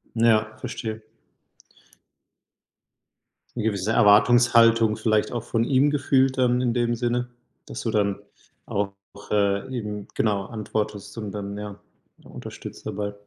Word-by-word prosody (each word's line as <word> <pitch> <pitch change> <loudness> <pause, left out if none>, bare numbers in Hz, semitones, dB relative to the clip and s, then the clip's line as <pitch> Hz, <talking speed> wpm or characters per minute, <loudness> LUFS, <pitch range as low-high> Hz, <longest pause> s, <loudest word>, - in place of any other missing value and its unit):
Ja, 110 -1 +3
verstehe. 110 -1 -5 2.5
'Ne 115 - -3
gewisse 105 -1 -1
Erwartungshaltung 115 +1 +5
vielleicht 110 -1 +1
auch 120 -2 -3
von 115 -1 0
ihm 135 +3 +3
gefühlt 135 -2 +2
dann, 125 -1 +2
in 120 -2 +1
dem 120 -1 +1
Sinne, 120 +1 -1 0.4
dass - - -7
du 115 - -2
dann 100 -2 0 0.5
auch, 100 0 -1 0.4
äh, 100 +2 +1
eben, 105 -3 -5
genau, 100 -3 0
antwortest 105 -1 -4
und 105 -3 -5
dann 100 0 -5
ja 105 -1 -7 0.4
unterstützt - - -10
dabei. 105 -1 -4
110 Hz, 120 wpm, -24 LUFS, 105-120 Hz, 2.5 s, Erwartungshaltung